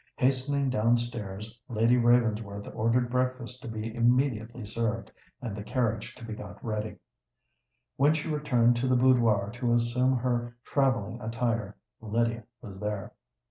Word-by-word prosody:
Hastening 135 +1 +1
down 120 0 +3
stairs, 110 -2 -5
Lady 115 +1 +3
Ravensworth 115 -4 +2
ordered 120 +2 +1
breakfast 125 -1 -1
to - - -8
be 110 0 -4
immediately 120 -1 +1
served, 115 +1 -2 0.3
and 110 -5 -3
the 105 - -5
carriage 115 +1 -1
to 120 - -10
be 110 - -5
got - - -8
ready. 110 -1 -3 1.0
When 145 +3 +4
she 155 - -3
returned 130 -6 +3
to 125 +2 0
the 130 - +3
boudoir 115 -5 +4
to 120 -1 +1
assume 125 +2 +2
her 120 -1 -1
travelling 125 -5 +1
attire, 115 -2 -2 0.2
Lydia 115 +1 0 0.2
was 100 -4 -9
there. 105 -2 -3
120 Hz, 140 wpm, -29 LUFS, 110-125 Hz, 1.0 s, When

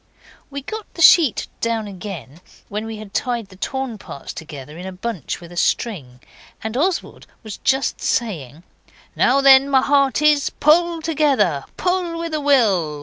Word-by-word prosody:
We 280 -1 -6
got 435 +6 -7
the 335 - -5
sheet 315 -7 +6
down 230 -1 -1
again 180 - -8 0.3
when 215 +2 -4
we 225 -1 -6
had 210 -2 -11
tied 240 -6 -2
the 190 - -15
torn 255 +2 -4
parts 140 - -9
together 150 -2 -9
in 180 +3 -7
a - - -5
bunch 185 - -5
with 175 0 -12
string, 135 - -2 0.4
and 220 +1 -4
Oswald 345 +7 -2 0.2
was 215 -3 -7
just 270 +1 0
saying 165 - -2 0.5
'Now 270 +3 +3
then, 275 0 +7
my 265 -2 +4
hearties, 285 +1 +3
pull 335 +2 +2
together, 270 - +1
pull 360 -2 -1
with 335 -1 -4
a 305 - -1
will! 200 - +2
235 Hz, 155 wpm, -20 LUFS, 185-285 Hz, 0.5 s, then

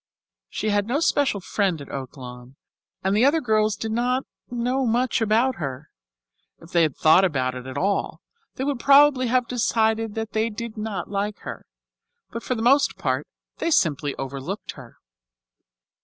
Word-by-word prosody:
She 215 - -2
had 205 0 +1
no 265 +5 0
special 285 -9 +1
friend 190 -2 -1
at 140 - -10
Oaklawn, 125 -1 -8 0.5
and 190 +1 +1
the 215 - +3
other 290 +4 +4
girls 215 -5 +1
did 220 - -4
not 250 +3 0 0.3
know 245 +2 -1
much 240 +1 +1
about 225 +4 +2
her. 140 -2 -6 0.7
If 165 - -16
they 170 - +3
had 155 -5 +1
thought 160 +4 +5
about 130 -8 0
it 125 0 -8
at 130 +1 -6
all, 195 +6 -1 0.4
they 260 - -3
would 280 -2 -1
probably 275 -1 +5
have 250 0 +1
decided 225 -2 0
that 225 -1 -4
they 220 +1 0
did 230 +1 -6
not 210 -4 -4
like 205 +1 -2
her; - - -8 0.6
but 230 - -5
for 255 - -2
the 225 - -3
most 275 +3 +4
part - - -1 0.3
they 335 - 0
simply 145 - +1
overlooked 135 +9 -5
her. 125 -4 -14
215 Hz, 170 wpm, -24 LUFS, 160-245 Hz, 0.7 s, thought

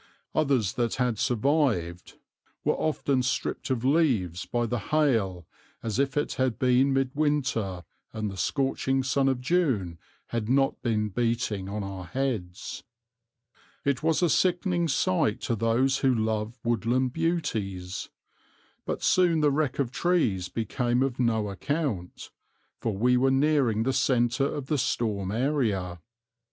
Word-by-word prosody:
Others 135 -10 +1
that 120 -2 -1
had 125 -4 0
survived 120 - 0 0.5
were - - +2
often 140 -4 0
stripped 125 +2 -2
of 130 -2 -1
leaves 125 - +1
by 120 -1 0
the 120 +1 -2
hail 110 - +1 0.4
as 115 +1 -2
if 140 0 0
it 145 - 0
had 130 -3 +1
been 130 +2 +3
mid 135 -1 +1
winter 125 - 0 0.3
and 110 -1 -3
the 100 - -5
scorching 135 - 0
sun 135 +1 +2
of 130 -2 0
June 125 - 0 0.3
had 115 -2 -2
not 135 +1 +2
been 105 -3 0
beating 115 -3 -1
on 105 +1 -3
our 95 -2 -6
heads. 110 -6 -3 1.0
It 140 -2 +1
was 160 +2 +1
a 175 - +4
sickening 175 -1 +2
sight 165 +1 +1
to 120 - -1
those 115 +5 +1
who 135 - +3
love 110 0 -1
woodland 120 +2 +1
beauties. 105 - -2 0.8
But - - -3
soon 175 -3 +3
the 150 -1 +4
wreck 145 -2 0
of 130 -4 -1
trees 125 - +1
became 120 +3 0
of 135 -2 -2
no 110 -4 +1
account, 100 - -3 0.5
for 110 -4 -2
we 125 +4 +3
were 135 +2 +3
nearing 135 -5 +2
the 130 +2 0
centre 130 +2 +2
of 145 - -4
the 145 +1 0
storm 100 -6 -1
area. 110 - 0
125 Hz, 145 wpm, -27 LUFS, 105-140 Hz, 1.0 s, a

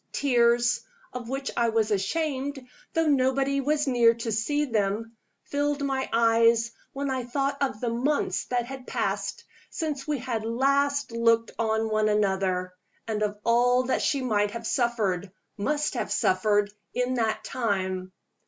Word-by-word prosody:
Tears 240 -3 +3 0.3
of 240 -2 -6
which 270 +1 -3
I 235 -1 +2
was 220 -1 +1
ashamed, 270 +5 -1 0.3
though 325 0 +2
nobody 275 -1 +2
was 295 +2 +1
near 240 -3 +4
to 230 0 -4
see 290 +8 0
them 225 -1 -1 0.3
filled 290 0 -1
my 265 -1 -1
eyes 230 0 +4 0.2
when 275 0 -3
I 260 -1 -1
thought 275 +3 -2
of 265 -6 -1
the 235 -1 -1
months 265 +6 0
that 245 -1 -1
had 260 0 -9
passed - - -2 0.3
since 300 -4 -4
we 300 -1 0
had 240 -3 -3
last 275 +4 +1
looked 230 0 +2
on 220 0 +1
one 215 -1 +1
another, 190 -3 0 0.3
and 215 -1 -2
of 210 -1 -1
all 245 +2 +3
that 255 +1 0
she 275 -2 +1
might 210 -4 +1
have 230 +2 -7
suffered, 210 -7 0 0.2
must 295 +8 -1
have - - -3
suffered, 205 +2 +2 0.2
in 250 +1 0
that 220 -3 0
time. 190 -6 -2
235 Hz, 155 wpm, -26 LUFS, 220-270 Hz, 0.3 s, near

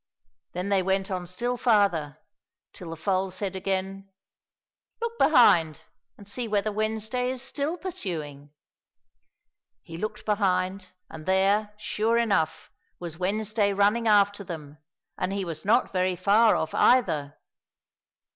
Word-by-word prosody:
Then 180 +3 -3
they 195 -1 +3
went 190 +1 -1
on 180 -1 -3
still 240 +8 -3
farther, 195 - +2 0.6
till 175 - -10
the 165 - -5
foal 190 +3 -1
said 190 +1 -4
again, 195 +1 -3 0.5
" - - -63
Look 465 0 -4
behind, 170 - +5 0.4
and 200 - -14
see 235 +3 -3
whether 210 0 0
Wednesday 220 +4 -2
is 260 0 -4
still 285 +5 -3
pursuing! 155 - -6 0.4
" - - -55 0.3
— - - -57 0.3
He 165 - -9
looked 215 +1 -5
behind, 190 -2 0 0.2
and 160 0 -11
there, 200 +3 +2
sure 220 +2 0
enough, 165 -9 0 0.3
was 170 -2 -7
Wednesday 205 +2 0
running 205 +4 +2
after 205 -1 +3
them, 155 -5 -9 0.4
and 185 - -1
he 195 -1 -2
was 160 -1 -6
not 230 +3 +2
very 185 0 +1
far 210 +4 +4
off 160 - -2
either. 150 - +2
195 Hz, 140 wpm, -26 LUFS, 180-215 Hz, 0.6 s, behind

